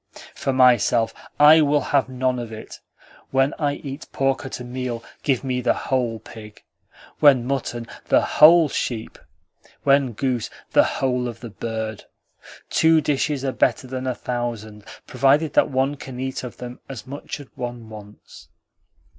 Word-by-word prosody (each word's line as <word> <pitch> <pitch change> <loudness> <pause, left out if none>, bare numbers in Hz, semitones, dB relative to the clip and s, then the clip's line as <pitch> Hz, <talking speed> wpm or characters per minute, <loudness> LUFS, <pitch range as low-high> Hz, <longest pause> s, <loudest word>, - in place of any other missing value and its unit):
"For 135 - -2
myself, 120 -3 +3 0.3
I 155 +2 +8
will 145 -1 +2
have 135 -2 +3
none 130 -1 -1
of 120 -2 -6
it. 110 0 -9 0.5
When 135 +1 +2
I 145 -2 0
eat 140 +1 -8
pork 135 -1 0
at - - -6
a - - -7
meal, 125 -1 -5 0.2
give 135 -4 0
me 130 -2 -1
the 120 - +2
WHOLE 120 -4 -2
pig; 105 -2 -12 0.6
when 135 -5 +5
mutton, 125 -3 -3 0.2
the - - +4
WHOLE 160 +1 +6
sheep; 115 -4 -4 0.6
when 140 -3 +3
goose, 125 0 -2 0.2
the - - +5
WHOLE 125 -2 -1
of 120 - -8
the 120 -2 -8
bird. 110 0 -5 0.7
Two 160 0 +4
dishes 145 -1 -1
are 135 - 0
better 130 - +1
than 130 0 -5
a 130 - -1
thousand, 115 -4 -5 0.2
provided 145 +2 +2
that - - +3
one 135 +1 0
can 130 -2 -9
eat 130 0 -4
of 125 - -8
them 125 0 -8
as 135 -4 -8
much 140 +2 -7
as 145 - -10
one 120 -2 -6
wants." 105 -1 -13
130 Hz, 160 wpm, -22 LUFS, 120-140 Hz, 0.7 s, I